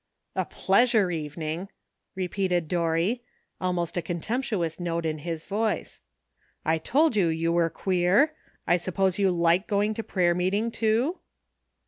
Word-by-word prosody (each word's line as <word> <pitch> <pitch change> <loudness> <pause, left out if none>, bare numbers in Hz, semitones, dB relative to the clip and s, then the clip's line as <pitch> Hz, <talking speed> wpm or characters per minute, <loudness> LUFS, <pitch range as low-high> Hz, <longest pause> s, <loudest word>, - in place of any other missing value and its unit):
''A - - -1
pleasure 210 -1 +3
evening! 160 +3 -4 0.2
" - - -54
repeated 185 -2 -1
Dorry, 170 +7 0 0.4
al 185 0 +1
most 175 -1 -2
a - - +1
contemptuous 175 0 -2
note 170 -1 -2
in 155 -1 -1
his 165 +1 -5
voice; 215 +2 -2 0.7
''I 160 0 +1
told 300 -1 +3
you 195 -5 +3
you 165 +1 0
were 170 -1 +3
queer. 190 - +2 0.3
I 175 - +4
suppose 190 +2 0
you 195 -1 +4
like 170 +2 +2
to - - -38
go 205 +1 +1
to 225 - -4
prayer 175 -4 +2
meeting, 195 +6 0
too 230 +11 +1
180 Hz, 150 wpm, -26 LUFS, 170-210 Hz, 0.7 s, I